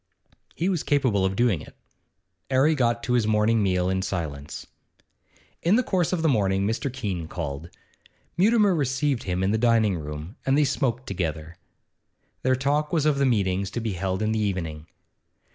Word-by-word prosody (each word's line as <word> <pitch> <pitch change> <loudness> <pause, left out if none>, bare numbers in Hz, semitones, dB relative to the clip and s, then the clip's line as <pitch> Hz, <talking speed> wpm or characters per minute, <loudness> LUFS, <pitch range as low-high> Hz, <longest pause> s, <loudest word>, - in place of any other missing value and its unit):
He 170 - -1
was 180 -5 0
capable 130 -9 +1
of 95 0 -1
doing 115 -8 +2
it. - - -13 0.7
'Arry 135 +4 +4
got 120 -4 0
to 125 - -1
his 120 -3 +2
morning 110 +1 +2
meal 90 -2 +1
in 95 0 0
silence. 75 -7 -5 1.0
In 175 +5 +3
the 250 - +3
course 180 -7 0
of 175 -3 -1
the - - +3
morning 100 -7 +2
Mr. 120 +6 -1
Keene 100 -10 -4
called. 80 -1 -5 0.7
Mutimer 205 +2 +4
received 140 -3 0
him 90 0 -1
in 95 - +1
the 110 - +1
dining 115 -4 +3
room, 75 +5 -7
and 135 +1 +2
they 150 - +4
smoked 130 -2 -1
together. 80 -3 -4 0.9
Their 130 0 +2
talk 145 +3 0
was 160 -4 +1
of 150 -2 +2
the 140 - +3
meetings 100 -5 0
to 120 - -4
be 110 -3 -3
held 95 +3 -2
in 110 - 0
the 110 - 0
evening. 85 -7 -3
110 Hz, 180 wpm, -25 LUFS, 95-140 Hz, 1.0 s, Arry